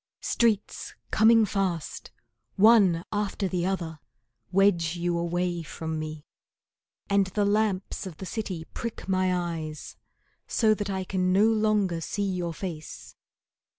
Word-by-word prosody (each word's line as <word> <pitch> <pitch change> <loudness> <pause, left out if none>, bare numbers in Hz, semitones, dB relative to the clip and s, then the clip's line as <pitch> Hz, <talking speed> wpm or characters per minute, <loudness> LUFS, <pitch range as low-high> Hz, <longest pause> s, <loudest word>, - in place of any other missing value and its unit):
Streets 220 -4 0 0.2
coming 225 0 +6
fast, 185 -5 -2 0.5
One 195 -5 +5
after 205 -1 -1
the 180 -1 -1
other, 170 -5 -3 0.5
Wedge 180 -4 +3
you 175 0 -1
away 175 0 -1
from 160 0 -5
me, 155 -1 -6 0.8
And 200 -1 +3
the 205 +2 0
lamps 205 -2 0
of 170 -5 -9
the 190 - -7
city 185 -4 -4
prick 230 -4 -5
my 185 -1 +2 0.3
eyes 155 -1 -7 0.5
So 220 -2 +3
that 205 -1 -3
I 190 -1 -2
can 185 -1 0
no 200 +3 +5
longer 215 -6 +2
see 205 +5 -2
your 180 -3 -2
face. 165 -3 -7
185 Hz, 130 wpm, -27 LUFS, 170-205 Hz, 0.8 s, coming